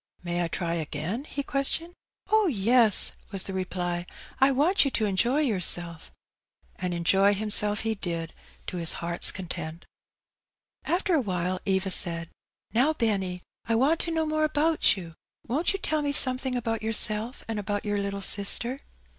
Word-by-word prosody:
May 175 0 -2
I - - -1
try 170 0 -3
again?" 165 - -4
he 280 -2 -5
questioned. 290 +5 -2 0.4
Oh, 435 -2 +4
yes," 230 - +5 0.2
was 195 -2 +3
the 195 - -5
reply; 180 -2 -3 0.2
" - - -21
I 270 - +6
want 305 +9 +3
you 275 - 0
to 225 -4 -1
enjoy 235 +9 +1
yourself. 175 - 0 0.7
And 180 -1 -3
enjoy 195 +4 +3
himself 210 0 +2
he 225 0 -1
did, 170 -5 -5 0.3
to 180 - -6
his 165 -2 +2
heart's 170 0 +2
content. 170 -3 -6 1.0
After 360 +1 0
awhile 185 - -1
Eva 190 0 0
said, 170 -2 +4 0.4
''Now, 285 +7 +2
Benny, 190 -6 -1 0.2
I 230 - 0
want 285 +8 +2
to 335 - -2
know 320 -1 0
more 310 0 -1
about 310 -5 +2
you: 170 -3 -9 0.3
won't 295 +9 0
you 390 - -2
tell 310 -5 -1
me 290 -1 -1
something 255 -2 +4
about 225 -2 -2
your 220 +1 -2
self 215 +4 -2
and 225 -2 -3
about 205 0 -3
your 205 -1 -1
little 200 0 -4
sister?" 235 +7 -1
210 Hz, 165 wpm, -26 LUFS, 180-270 Hz, 1.0 s, I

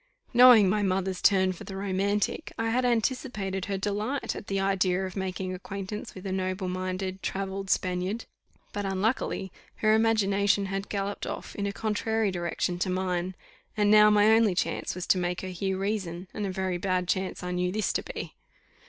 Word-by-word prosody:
Knowing 240 -4 +8
my 210 +3 +2
mother's 190 -1 0
turn 190 -1 +4
for 180 - -8
the 195 - -7
romantic, 200 +7 -1
I 225 0 0
had 250 +2 +1
anticipated 225 -5 -1
her 200 -1 -2
delight 210 +7 -2
at - - -8
the 195 -2 -1
idea 190 -1 +1
of 185 - -7
making 190 -1 -3
acquaintance 195 +4 -6
with 185 +1 -9
a 190 - -2
noble 185 0 -2
minded 185 +1 -3
travelled 195 0 -3
Spaniard; 185 +5 0 0.5
but 205 - -2
unluckily 195 0 -1 0.2
her 215 0 +3
imagination 205 -3 +3
had 195 +1 -4
galloped 200 0 -3
off - - -6
in 200 -1 -2
a - - -1
contrary 220 0 0
direction 175 0 -2
to 185 - 0
mine, 185 0 -1 0.4
and 205 -1 +3
now 210 0 +8
my 210 +1 +5
only 220 -4 +4
chance - - -1
was 180 0 -4
to 185 - +3
make 180 0 -1
her 185 - -5
hear 190 +1 -2
reason, 190 -3 -3
and 205 -1 -2
a - - -2
very 185 -1 -2
bad 185 -1 0
chance 190 0 -1
I 180 - -3
knew 180 0 0
this 215 +2 0
to - - 0
be. - - -7
195 Hz, 185 wpm, -28 LUFS, 185-210 Hz, 0.5 s, Knowing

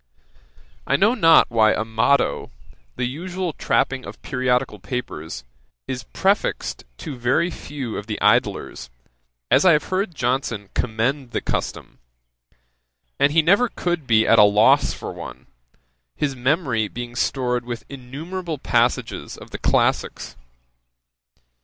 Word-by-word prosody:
I - - +2
know 210 +11 +4
not 165 - +5
why 110 -2 +4
a 110 - -2
motto, 110 +5 +1 0.5
the 125 - -1
usual 175 +6 -4
trapping 135 -1 0
of - - -10
periodical 125 -4 0
papers, 90 - -5 0.4
is 125 -1 -5
prefixed 195 +2 -1
to 145 - -6
very 125 +8 +1
few 135 -8 -6
of 105 - -7
the 105 - -4
Idlers, 100 - +1 0.6
as - - +5
I 185 -2 +6
have 150 - +2
heard 185 -2 -1
Johnson 120 -5 -2
commend 125 +3 -1
the - - 0
custom: - - -4 1.2
and 140 +1 +4
he 160 +1 +4
never 200 +9 +4
could 175 -6 -3
be 110 -1 +4
at 115 - +5
a - - +9
loss 105 +2 +4
for - - -7
one, - - -9 0.7
his 140 -3 -1
memory 130 - 0
being 120 +3 -7
stored 125 -1 0
with 120 -2 -6
innumerable 155 +6 -6
passages - - 0
of - - -13
the - - -6
classicks. - - 0
130 Hz, 135 wpm, -22 LUFS, 115-155 Hz, 1.2 s, a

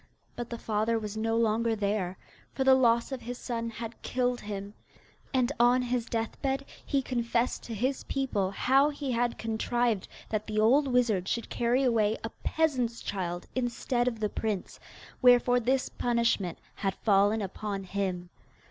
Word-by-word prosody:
But 240 -1 -5
the 235 - -4
father 220 +1 0
was 210 -1 -5
no 225 +1 0
longer 230 0 +2
there, 200 -3 -1 0.4
for 265 - 0
the 265 0 +7
loss 235 -1 +3
of 265 -2 -4
his 245 +1 -6
son 230 -2 -3
had 230 +1 -7
killed 245 -1 0
him; 200 -1 -6 0.6
and 255 -1 +2
on 245 +1 +5
his 245 -1 -1
deathbed 265 +4 -2 0.2
he 275 -2 0
confessed 240 -1 0
to 230 - -5
his 255 +5 -1
people 240 -9 0
how 270 +8 +3
he 285 -2 -4
had 240 0 0
contrived 225 -1 0 0.2
that 215 -1 -2
the 215 -1 -1
old 265 +7 +4
wizard 235 -8 +2
should 235 - -2
carry 240 +3 +2
away 225 -4 +2
a 225 - -4
peasant's 255 -8 0
child 175 -3 -3
instead 245 0 0
of 230 -3 -1
the 210 -1 0
prince, 210 -4 -3 0.4
wherefore 245 0 +6
this 255 +2 +1
punishment 235 -7 0 0.2
had 195 -2 -1
fallen 205 +1 +3
upon 200 0 -4
him. 185 -2 -3
230 Hz, 160 wpm, -29 LUFS, 210-250 Hz, 0.6 s, the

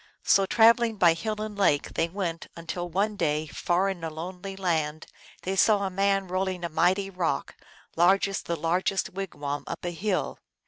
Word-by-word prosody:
So 195 -1 +4
traveling 230 0 +4
by 170 -4 +5
hill 215 +6 -4
and 215 -1 -4
lake, 175 -8 +1
they 165 - 0
went, 170 -3 -4
until 175 +1 -5
one 200 +5 0
day, 155 -4 0
far 175 +4 0
in 190 -4 -4
a 165 - -2
lonely 180 +5 -7
land, 160 -5 -1 0.4
they 190 +1 -2
saw 205 +1 +4
a 190 - -2
man 195 0 +1
rolling 185 0 -2
a - - -3
mighty 190 +4 +1
rock, 180 -3 -2 0.4
large 185 +4 +4
as 195 - -3
the 170 - -3
largest 180 +4 0
wigwam, 150 -7 -4
up - - -6
a 175 - -1
hill. 185 +3 -2
185 Hz, 180 wpm, -27 LUFS, 165-195 Hz, 0.4 s, by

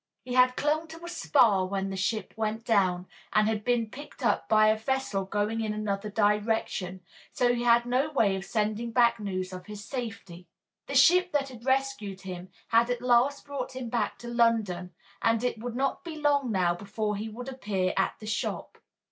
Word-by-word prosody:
He 250 - -5
had 255 0 +5
clung 310 +2 0
to 325 +1 -10
a - - -6
spar 230 - +3
when 195 0 -2
the - - -4
ship 195 +2 -2
went 220 +1 -2
down, 185 -5 +2 0.3
and 215 - +4
had 215 -1 -1
been 240 -1 +1
picked 285 -1 -8
up - - +1
by 215 0 +5
a 215 - +4
vessel 220 -4 -1
going 210 +3 -1
in 215 -1 -2
another 210 -1 -2
direction, 205 -3 0 0.3
so 245 -1 +2
he 240 - -2
had 235 0 +5
had - - -20
no 255 +5 +1
way 215 -9 +2
of 190 - -4
sending 215 +2 -1
back 235 -1 +4
news 185 -2 -4
of 180 -1 -9
his 210 -1 -8
safety. 220 -9 -6 0.4
The 280 - -4
ship 360 +6 +5
that 275 -2 +1
had 245 -1 -12
rescued 260 -8 0
him 185 -1 -7 0.2
had 230 +1 +4
at 245 0 -2
last 250 +3 +3
brought 270 -2 -5
him 255 -2 -5
back 235 0 -1
to 240 - -10
London, 225 -7 +1 0.3
and 230 0 +2
it 245 -3 -1
would 240 +1 -5
not 270 +1 -1
be 335 -2 -6
long 285 -4 +1
now 180 -4 +2
before 210 +3 -3
he 215 +2 -4
would 245 +4 -8
appear 205 -8 -1
at 195 - +1
the 215 - -10
shop. 215 0 -3
225 Hz, 200 wpm, -28 LUFS, 200-250 Hz, 0.4 s, had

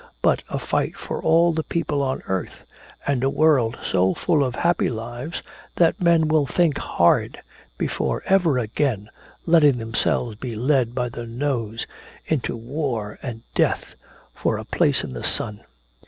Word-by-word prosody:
But - - +3
a - - -2
fight - - -1
for - - -5
all 170 +1 +4
the 160 - 0
people 155 -3 -1
on 135 -1 -2
earth! 95 -1 -4 0.4
and 135 -3 0
a 135 - +3
world 135 -6 +3
so 95 0 +2
full 155 -5 +2
of 130 -2 -2
happy 175 0 +2
lives 120 +7 -5 0.3
that 170 0 +3
men 170 -2 +4
will 155 -2 +2
think 165 0 +2
hard 85 - +2 0.4
before - - -1
ever 175 -8 +3
again 115 -2 -1 0.3
letting 150 -6 +5
themselves 115 0 -1
be 120 0 -5
led 125 0 +1
by 125 -1 -1
the 120 0 -7
nose 115 -3 -2 0.4
into 145 -6 -1
war 120 -4 -3
and 115 -3 -6
death - - 0 0.4
for - - -1
a - - -7
place - - +2
in 65 - -6
the - - -6
sun!" 105 -2 -1
130 Hz, 155 wpm, -23 LUFS, 115-155 Hz, 0.4 s, letting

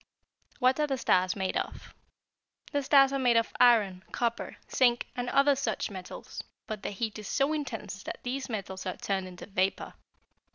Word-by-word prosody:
WHAT 260 +1 +3
ARE 300 - +2
THE 270 -2 -1
STARS 185 -6 +2
MADE 190 -2 -1
OF? - - -5 0.8
"The 285 - +1
stars 275 0 +5
are 275 - 0
made 245 -3 +4
of 230 - +1
iron, 205 -7 +5
copper, 235 -1 -2 0.2
zinc, 240 -2 +3
and 245 -1 -2
other 280 +2 +4
such 245 -6 -2
metals, 185 -2 -7 0.2
but 215 -2 -5
the - - -3
heat 215 +2 -3
is 210 - -7
so 275 +3 +1
intense 225 -9 -4
that - - -6
these 260 +2 -3
metals 190 -4 -5
are 185 - -3
turned 190 -2 -2
into 180 -1 -10
vapor. 195 -1 -1
230 Hz, 175 wpm, -29 LUFS, 195-265 Hz, 0.8 s, stars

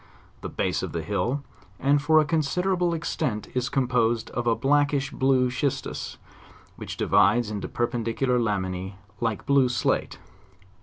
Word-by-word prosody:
The - - -5
base - - -1
of - - -5
the 85 -1 -3
hill, 120 - -1 0.4
and 140 +1 +3
for 155 +2 +4
a 155 - +3
consider 165 +5 0
able 175 -1 +1
extent 150 -9 -2
is 125 -1 -1
composed 120 -3 +1
of 120 0 -3
a 115 - +4
blackish 145 0 +1
blue 130 -2 +2
schistus, 130 +2 -3 0.6
which - - -7
divides 120 -3 +3
into 105 -1 -4
perpendicular 120 +1 0
lamina 95 -4 -2 0.3
like 115 -3 -2
blue 140 -2 +4
slate. 110 -7 0
125 Hz, 145 wpm, -25 LUFS, 115-140 Hz, 0.6 s, for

